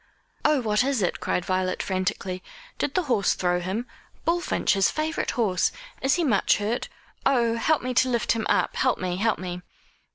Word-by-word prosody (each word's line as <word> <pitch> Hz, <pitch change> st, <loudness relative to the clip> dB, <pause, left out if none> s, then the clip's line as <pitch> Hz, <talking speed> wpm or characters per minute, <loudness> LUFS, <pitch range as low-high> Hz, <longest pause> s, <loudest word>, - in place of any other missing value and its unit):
"Oh, 300 Hz, -3 st, +3 dB
what 215 Hz, 0 st, +2 dB
is 265 Hz, -6 st, 0 dB
it?" 175 Hz, -, -1 dB
cried 180 Hz, -, -1 dB
Violet 185 Hz, 0 st, 0 dB
frantically. 185 Hz, -1 st, -2 dB, 0.4 s
"Did 280 Hz, -, -1 dB
the 370 Hz, -, +2 dB
horse 235 Hz, -, +2 dB
throw 180 Hz, -1 st, +1 dB
him? 190 Hz, +7 st, -3 dB, 0.4 s
Bullfinch, 345 Hz, +1 st, +1 dB
his 195 Hz, -1 st, +3 dB
favourite 310 Hz, +1 st, -2 dB
horse. 195 Hz, -7 st, +2 dB, 0.3 s
Is 270 Hz, +2 st, +3 dB
he 350 Hz, -, 0 dB
much 220 Hz, -10 st, +3 dB
hurt? 215 Hz, +4 st, -2 dB, 0.3 s
Oh, 235 Hz, -4 st, +3 dB
help 300 Hz, +6 st, +1 dB
me 255 Hz, 0 st, -2 dB
to 255 Hz, +1 st, +3 dB
lift 235 Hz, -3 st, +1 dB
him 225 Hz, -1 st, 0 dB
up -, -, +2 dB
help 260 Hz, -2 st, +2 dB
me 180 Hz, -1 st, -2 dB
help 220 Hz, +2 st, +1 dB
me!" 180 Hz, -1 st, -5 dB
225 Hz, 185 wpm, -25 LUFS, 185-260 Hz, 0.4 s, Oh